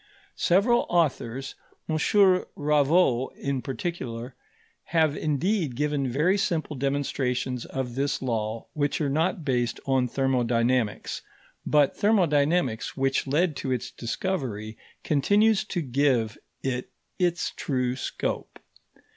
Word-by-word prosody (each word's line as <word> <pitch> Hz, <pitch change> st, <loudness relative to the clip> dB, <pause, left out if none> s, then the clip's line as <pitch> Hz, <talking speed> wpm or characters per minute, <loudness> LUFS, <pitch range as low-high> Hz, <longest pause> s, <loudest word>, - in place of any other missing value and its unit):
Several 210 Hz, +7 st, +3 dB
authors, 135 Hz, -6 st, 0 dB, 0.3 s
M. 160 Hz, -, -1 dB, 0.6 s
Raveau 145 Hz, -3 st, +3 dB
in 140 Hz, -2 st, -2 dB
particular, 130 Hz, -3 st, -5 dB, 0.5 s
have 160 Hz, -3 st, +2 dB
indeed 155 Hz, -, 0 dB
given 145 Hz, -2 st, 0 dB
very 170 Hz, +10 st, +2 dB
simple 160 Hz, -6 st, -1 dB
demonstrations 130 Hz, -2 st, -1 dB
of 130 Hz, -2 st, -4 dB
this 140 Hz, +2 st, -1 dB
law 115 Hz, -3 st, -2 dB
which 145 Hz, -2 st, 0 dB
are 145 Hz, -3 st, 0 dB
not 160 Hz, +2 st, 0 dB
based 120 Hz, -4 st, 0 dB
on 130 Hz, -2 st, +2 dB
thermodynamics; 125 Hz, -3 st, 0 dB, 0.5 s
but 145 Hz, -2 st, +3 dB
thermodynamics, 160 Hz, -, +2 dB
which 135 Hz, 0 st, +1 dB
led 155 Hz, +3 st, +1 dB
to 130 Hz, -, -3 dB
its 125 Hz, -3 st, -2 dB
discovery, 115 Hz, -, -3 dB, 0.3 s
continues 205 Hz, +8 st, +3 dB
to 180 Hz, -5 st, -2 dB
give 125 Hz, -5 st, +1 dB, 0.3 s
it 125 Hz, -2 st, -2 dB, 0.3 s
its 175 Hz, -1 st, +1 dB
true 125 Hz, -3 st, -1 dB
scope. 130 Hz, -, -4 dB
140 Hz, 110 wpm, -26 LUFS, 125-160 Hz, 0.6 s, Several